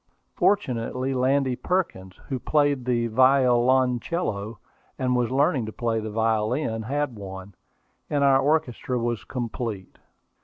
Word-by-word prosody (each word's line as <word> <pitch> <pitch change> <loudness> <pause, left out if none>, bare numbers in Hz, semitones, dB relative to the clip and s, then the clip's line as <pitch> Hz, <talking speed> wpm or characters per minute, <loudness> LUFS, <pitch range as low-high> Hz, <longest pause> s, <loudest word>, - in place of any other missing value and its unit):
Fortunately, 130 - 0
Landy 130 0 +1
Perkins, 110 - -2
who 130 -2 -3
played 145 -2 +1
the 120 -2 +1
violoncello, 125 - +2 0.4
and 125 -1 0
was 125 -1 +1
learning 130 -3 +1
to - - -5
play 115 0 -1
the 110 0 -5
violin, 110 +2 0
had 140 +2 -2
one, 95 -1 -9 0.6
and 145 -1 +1
our 135 -1 +5
orchestra 135 -4 0
was 120 -2 -2
complete. 115 -5 -5
125 Hz, 120 wpm, -25 LUFS, 115-135 Hz, 0.6 s, our